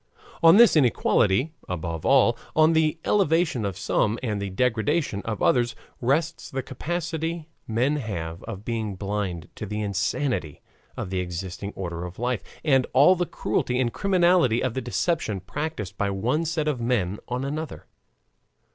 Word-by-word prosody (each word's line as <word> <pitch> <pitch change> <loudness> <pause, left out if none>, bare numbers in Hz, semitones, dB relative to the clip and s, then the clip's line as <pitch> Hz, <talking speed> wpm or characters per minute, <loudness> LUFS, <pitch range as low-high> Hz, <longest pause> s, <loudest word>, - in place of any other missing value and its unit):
On 165 +3 +8
this 235 -4 +7
inequality, 125 -1 +3 0.2
above 85 -3 -3
all, 130 -3 +5 0.2
on 155 +1 +5
the 160 0 +2
elevation 165 - +2
of 95 -2 -3
some 105 +2 +1
and 105 -4 -2
the 100 - -3
degradation 110 - 0
of 110 -2 -3
others, 120 -1 +2 0.3
rests 155 +7 0
the 135 -1 -3
capacity 165 +2 -3 0.2
men 125 +7 +1
have 85 - -5
of 105 -2 -7
being 110 -4 -2
blind 95 -4 -3
to 105 - -6
the 105 +2 -3
insanity 100 - -2 0.3
of 90 - -4
the 95 - 0
existing 90 +2 -5
order 85 -2 -4
of 90 0 -8
life, 125 -3 -1 0.2
and 135 -4 +3
all 145 +8 +6
the 175 -1 -1
cruelty 125 +4 -1
and 120 -2 0
criminality 175 - +3
of 130 - 0
the 130 - -2
deception 120 - -1
practiced 105 - -5
by 100 - +1
one 120 +12 0
set 160 -1 -1
of 140 -5 -1
men 105 -5 0
on 125 +2 -2
another. 155 +2 -5
120 Hz, 155 wpm, -25 LUFS, 100-155 Hz, 0.3 s, On